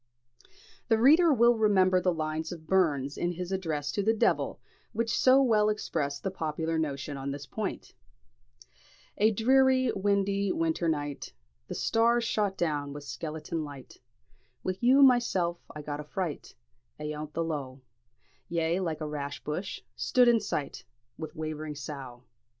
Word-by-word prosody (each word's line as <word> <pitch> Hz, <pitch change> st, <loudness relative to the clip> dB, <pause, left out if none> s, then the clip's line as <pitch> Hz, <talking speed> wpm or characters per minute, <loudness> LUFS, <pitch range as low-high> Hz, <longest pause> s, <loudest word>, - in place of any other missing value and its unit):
The 225 Hz, -, +3 dB
reader 310 Hz, +8 st, +6 dB
will 240 Hz, -2 st, +5 dB
remember 190 Hz, -4 st, +4 dB
the 180 Hz, -, +2 dB
lines 155 Hz, -1 st, -3 dB
of 165 Hz, -3 st, -8 dB
Burns 150 Hz, -7 st, +1 dB
in 175 Hz, 0 st, 0 dB
his 180 Hz, +1 st, -5 dB
address 160 Hz, -7 st, -2 dB
to 205 Hz, -, -1 dB
the 220 Hz, +3 st, +2 dB
"De'il," -, -, +1 dB, 0.4 s
which 230 Hz, +1 st, 0 dB
so 265 Hz, +1 st, +5 dB
well 215 Hz, -4 st, +3 dB
express 150 Hz, -9 st, -2 dB
the 195 Hz, -, -3 dB
popular 160 Hz, -1 st, -2 dB
notion 145 Hz, -2 st, -3 dB
on 135 Hz, +1 st, -4 dB
this 140 Hz, +1 st, -5 dB
point: 210 Hz, +6 st, -5 dB, 1.3 s
"Ae 215 Hz, +2 st, +5 dB
dreary, 260 Hz, +3 st, +3 dB
windy, 200 Hz, 0 st, +1 dB
winter 165 Hz, +1 st, 0 dB
night, 145 Hz, -2 st, -3 dB, 0.3 s
The -, -, -5 dB
stars 235 Hz, +1 st, +2 dB
shot 205 Hz, -4 st, 0 dB
down 145 Hz, -4 st, -1 dB
wi' 145 Hz, -, -7 dB
sklentin 155 Hz, +2 st, -5 dB
light, 140 Hz, -3 st, -10 dB, 0.6 s
Wi' 185 Hz, 0 st, -2 dB
you 260 Hz, +3 st, +6 dB
mysel, 210 Hz, -10 st, +3 dB
I 150 Hz, -, -8 dB
got 145 Hz, 0 st, -4 dB
a -, -, -5 dB
fright 165 Hz, +1 st, -5 dB, 0.4 s
Ayont 150 Hz, 0 st, -5 dB
the 165 Hz, -, -1 dB
lough; 140 Hz, -5 st, -5 dB, 0.7 s
Ye, 170 Hz, +1 st, 0 dB
like 165 Hz, -4 st, -3 dB
a 155 Hz, -, -2 dB
rash 145 Hz, -1 st, -5 dB
bush, 175 Hz, +6 st, -4 dB
stood 250 Hz, -2 st, +3 dB
in 235 Hz, -1 st, +5 dB
sight 150 Hz, -8 st, -4 dB, 0.4 s
Wi' 160 Hz, -, -4 dB
waving 155 Hz, -1 st, -5 dB
sough. 135 Hz, -4 st, -8 dB
170 Hz, 150 wpm, -29 LUFS, 150-215 Hz, 1.3 s, reader